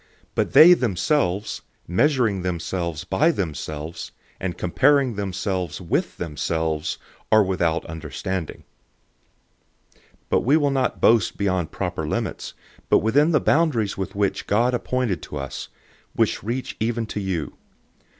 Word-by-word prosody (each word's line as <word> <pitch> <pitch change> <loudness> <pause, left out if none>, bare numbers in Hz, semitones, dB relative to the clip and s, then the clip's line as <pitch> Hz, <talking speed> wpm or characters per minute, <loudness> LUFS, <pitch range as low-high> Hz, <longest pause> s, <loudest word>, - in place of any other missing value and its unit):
But - - -1
they 175 +3 +10
themselves, 105 - 0 0.3
measuring 115 - +2
themselves 85 -2 -3
by 160 - +2
themselves, 80 - -4 0.3
and 90 -2 -3
comparing 135 +7 +3
themselves 95 -3 -3
with 90 -3 -2
themselves, 80 0 -2 0.3
are 110 -1 +6
without 85 -4 0
understanding. 80 +2 -5 1.3
010:013 - - -31 0.3
But - - +3
we 140 +6 +4
will 145 -3 +2
not 130 -3 -1
boast 115 -1 +4
beyond 95 -5 0
proper 90 -5 -3
limits, - - -3 0.3
but - - +6
within 140 +9 +3
the 150 - +4
boundaries 145 -11 +2
with 95 0 -5
which 100 -1 -1
God 120 +5 +2
appointed 125 -5 -1
to 75 - -7
us, 70 -1 -5 0.5
which - - +1
reach 120 +5 -4
even 115 +1 -1
to 105 - -5
you. 95 -6 -3
95 Hz, 130 wpm, -23 LUFS, 85-125 Hz, 1.3 s, they